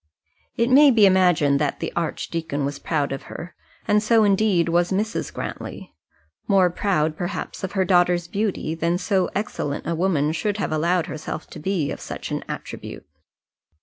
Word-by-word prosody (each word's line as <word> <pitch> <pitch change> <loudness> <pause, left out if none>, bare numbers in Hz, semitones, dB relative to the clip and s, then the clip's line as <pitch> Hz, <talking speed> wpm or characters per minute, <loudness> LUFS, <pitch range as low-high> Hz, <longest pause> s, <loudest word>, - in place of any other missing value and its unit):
It 235 +2 +2
may 285 +2 +8
be 225 -5 +6
imagined 180 -7 +4
that 145 -1 -1
the - - -4
archdeacon 160 -3 -2
was 140 0 -4
proud 145 -4 -1
of 135 - -4
her, 175 - -8 0.3
and 210 0 +4
so 220 +1 +4
indeed 200 -4 +3
was 175 +2 +1
Mrs. 210 +3 -1
Grantly - - -7 0.5
more 190 -3 +4
proud, 160 -5 0
perhaps, 175 +4 -5
of 190 - -3
her 190 -2 +1
daughter's 175 -1 +3
beauty, 195 -5 -2
than 170 +2 0
so 190 -1 0
excellent 150 -8 -3
a 170 - -1
woman 160 -4 +1
should 200 +6 -1
have 200 - -2
allowed 170 +2 +1
herself 155 -3 -6
to - - -8
be 170 -3 -1
of - - -6
such - - -6
an - - -2
attribute. - - -7
175 Hz, 170 wpm, -23 LUFS, 160-200 Hz, 0.5 s, may